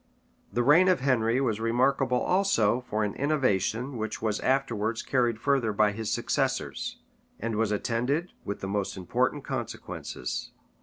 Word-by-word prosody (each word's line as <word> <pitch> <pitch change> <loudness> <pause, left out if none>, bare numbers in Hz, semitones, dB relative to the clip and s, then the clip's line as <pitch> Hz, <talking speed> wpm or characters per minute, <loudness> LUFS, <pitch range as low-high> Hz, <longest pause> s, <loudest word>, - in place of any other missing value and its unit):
The 120 +4 +1
reign 160 +8 +6
of 185 -7 +3
Henry 125 -2 +2
was 115 -6 0
remarkable 125 +2 +2
also 130 - +2
for 110 0 0
an 105 -1 -1
innovation 130 -3 0
which 110 0 -3
was 110 -2 -1
afterwards 115 -4 0
carried 120 -4 +1
further 135 -4 +1
by 105 0 +3
his 110 +1 -4
successors, 130 - -1 0.4
and 115 0 -2
was 110 -1 +1
attended 125 - -1
with 100 - -5
the 95 - -3
most 100 -1 -2
important 90 -2 0
consequences. 60 0 -5
115 Hz, 145 wpm, -28 LUFS, 105-135 Hz, 0.4 s, reign